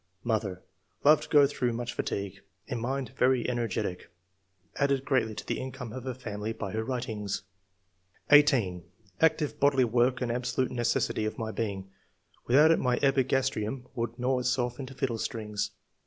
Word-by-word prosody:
Mother 105 -5 -1 0.2
— - - -41
Loved 150 +2 +7
to - - -17
go 145 -2 +7
through 125 -4 -1
much 120 +1 -4
fatigue. 100 -1 -3 0.3
In 120 - -4
mind 130 +2 -2
very 125 -2 +2
energetic; 115 -7 -2 0.7
added 140 -1 +1
greatly 120 -6 +1
to - - -7
the - - -2
income 130 -3 -6
of 130 +1 -7
her 130 -2 -3
family 110 -3 -4
by 110 -3 -5
her 110 +2 -2
writings." 110 -5 -3 0.9
18. 130 - +5 0.4
"Active 155 -2 +2
bodily 135 -2 +4
work 120 +2 +2
an 120 -2 0
absolute 125 +1 -1
necessity 120 -2 0
of 110 - -3
my 110 -1 -3
being; 100 -4 -4 0.6
without 150 +6 +6
it 165 - +3
my 125 -1 +1
epigastrium 130 -3 +1
would 115 0 -3
gnaw 125 +1 +1
itself 125 0 -1
into 135 -1 -7
fiddle 125 -4 -1
strings. 105 -3 -3
125 Hz, 160 wpm, -29 LUFS, 110-130 Hz, 0.9 s, Loved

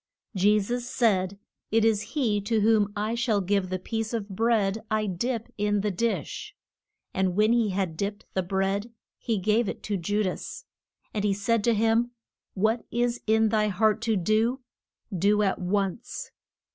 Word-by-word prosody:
Je 205 +3 +4
sus 240 +4 -2
said, 200 -6 +1 0.3
It 225 0 +3
is 215 -2 +1
he 215 -7 +2
to 215 +2 +1
whom 210 -1 +3
I 210 +2 -1
shall 235 -3 +1
give 195 0 0
the 185 - -1
piece 225 +4 -3
of 215 -2 -4
bread 215 0 +1
I 215 0 +1
dip 230 +5 -3
in 205 0 +1
the 210 0 0
dish. 200 -4 -2 0.6
And 185 -1 0
when 215 +3 +4
he 235 -3 +2
had 185 -4 -2
dipped 205 +2 -3
the 190 - +1
bread 195 +4 -1 0.3
he 225 -2 -1
gave 215 +3 +2
it - - -6
to 205 -2 -1
Ju 205 +4 0
das. 445 - -4 0.5
And 210 - -1
he 200 -2 +2
said 205 +2 +1
to 235 -1 +4
him, 225 +2 +2 0.5
What 220 +4 +1
is 240 0 0
in 220 0 +4
thy 215 -1 +2
heart 215 +2 +2
to 220 - +3
do, 220 +7 +1 0.5
do 205 +4 +3
at 195 - 0
once. 195 +3 -2
210 Hz, 170 wpm, -27 LUFS, 195-225 Hz, 0.6 s, Je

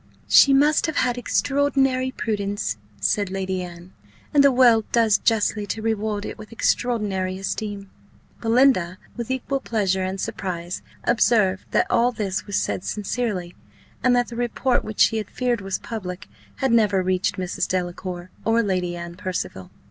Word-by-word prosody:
"She 275 - +7
must 290 +4 +4
have 315 - -3
had 245 -2 +1
extraordinary 270 0 +1
prudence," 205 - -2 0.2
said 195 - +1
Lady 190 -1 -2
Anne; 175 +1 -10 0.4
"and 285 -1 +6
the 280 - +6
world 240 -4 +4
does 225 -3 +4
justly 215 -2 +1
to 220 - -3
reward 215 -2 -1
it - - -7
with 215 +1 -11
extraordinary 205 -6 0
esteem." 200 0 -4 0.5
Belinda, 225 -7 +3 0.2
with 235 -1 -5
equal 260 +1 -1
pleasure 195 -6 0
and 190 +1 -3
surprise, 175 -2 -4 0.2
observed 215 -5 +2
that - - +2
all 240 +1 +3
this 205 -5 -3
was 205 - -3
said 180 - -1
sincerely, 205 -5 -3 0.5
and 250 0 +4
that 245 0 +1
the 235 - -8
report, 245 +1 0
which 215 -1 -3
she 225 - +5
had 215 -2 -4
feared 245 -3 -1
was 195 0 -2
public, 185 -5 -6 0.3
had 265 -2 0
never 210 -5 +3
reached 185 0 0
Mrs. 185 -1 -2
Delacour 180 0 -4
or 230 +1 +2
Lady 180 -3 -1
Anne 170 0 -7
Percival. 180 - -4
210 Hz, 155 wpm, -23 LUFS, 185-240 Hz, 0.5 s, She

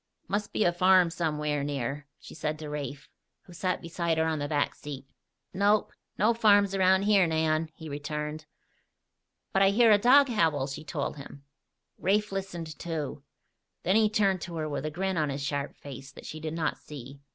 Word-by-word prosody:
"Must 205 +1 -2
be - - +1
a 175 - +3
farm 185 -1 +5
somewhere 150 -4 -1
near," 140 0 -3
she - - -12
said 155 0 -3
to 155 -1 -7
Rafe, 145 -1 -5 0.4
who 180 - -15
sat 180 +1 -2
beside 170 -1 -1
her 160 - +2
on 160 -1 -1
the 145 - -2
back 145 -1 0
seat. 140 -2 -8 0.5
"Nope. 205 +3 +2 0.2
No 220 +3 +4
farms 205 -3 +4
around 190 0 +4
here, 200 -3 +4
Nan," 160 0 +1
he 160 - -9
returned. 150 +1 -5 1.1
"But 195 - +3
I 195 - +6
hear 225 +3 +5
a 205 - +6
dog 275 +6 +6
howl," 160 - +1
she 140 +3 -6
told 150 -1 -3
him. 140 0 -11 0.6
Rafe 210 +3 +1
listened, 175 -5 -5
too. 160 -5 -4 0.6
Then 190 - +2
he 220 -1 +4
turned 195 -4 +2
to 170 0 -6
her 155 -1 -2
with 145 0 -3
a - - -1
grin 190 +3 -2
on 155 -2 +1
his 140 0 -3
sharp 140 0 -3
face 140 -1 -10
that - - -12
she 155 - -7
did 155 0 -4
not 165 -1 -1
see. 140 -1 -10
160 Hz, 190 wpm, -28 LUFS, 150-195 Hz, 1.1 s, I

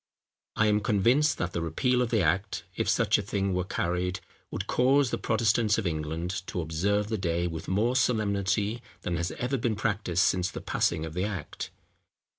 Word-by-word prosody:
I 110 - +3
am 105 -1 +3
convinced 120 +9 +3
that 90 0 -2
the 85 - -1
repeal 125 +10 +1
of 125 - 0
the 110 -5 +2
act, 95 +6 0
if - - -1
such - - +3
a - - -1
thing 100 -1 -1
were 90 0 0
carried, 90 0 -1 0.3
would - - -4
cause 130 +1 +3
the - - -1
Protestants 110 -1 +2
of 115 - -2
England 80 +2 -2
to - - -3
observe 95 +6 0
the 110 -2 -1
day 85 -1 0
with 80 -2 -5
more 110 +7 +1
solemnity 105 -2 +1 0.2
than 90 - -1
has 85 0 -1
ever 130 +3 -1
been 115 -1 0
practised 100 -4 0
since 90 -1 +2
the - - -6
passing 80 - 0
of 80 - -7
the 90 +3 -1
act. 95 -8 -5
100 Hz, 190 wpm, -28 LUFS, 90-110 Hz, 0.3 s, I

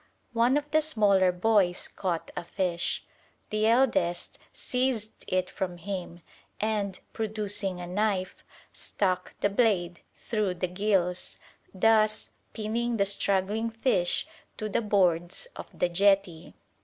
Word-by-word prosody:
One 240 +4 +4
of 295 0 -4
the 310 0 +4
smaller 205 -11 +3
boys 180 -1 +2
caught 175 -4 -3
a 180 - -3
fish. 175 -1 -2 0.5
The 215 +1 +2
eldest 230 -8 +2
seized 250 -4 -2
it 185 0 +1
from 180 -2 -4
him, 175 -1 -5 0.4
and, 205 -3 -1
producing 205 -4 -3
a 175 - -5
knife, 190 0 -1 0.3
stuck 185 -2 -1
the 205 - +3
blade 190 -6 +2 0.2
through 210 -5 -1
the 180 - -1
gills, 185 -2 0 0.3
thus 215 +2 +3 0.2
pinning 230 +2 -1
the 200 - +3
struggling 200 +2 0
fish 225 -6 +1 0.3
to 215 - -3
the 205 - +1
boards 185 - +1
of - - -7
the 180 - 0
jetty. 190 -2 +2
200 Hz, 125 wpm, -28 LUFS, 180-220 Hz, 0.5 s, One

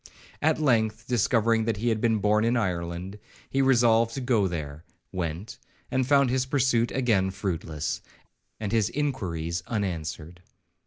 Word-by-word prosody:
At 155 +1 +2
length, 115 -6 +1
discovering 115 -1 +2
that 110 -3 0
he 120 +4 0
had 110 -2 0
been 115 -1 +2
born 105 +1 +2
in 120 +2 +2
Ireland, 90 -1 -3 0.3
he 135 - +2
resolved 115 -3 +4
to - - -2
go 120 -6 +2
there,—went, 85 +3 -6 0.3
and 130 -1 +1
found 140 -2 +4
his 130 0 0
pursuit 130 -4 +2
again 110 -8 +2
fruitless, 85 -6 -3 0.6
and 105 -2 -3
his 110 -2 +2
inquiries 90 - -2
unanswered. 85 -5 -4
110 Hz, 140 wpm, -26 LUFS, 90-120 Hz, 0.6 s, resolved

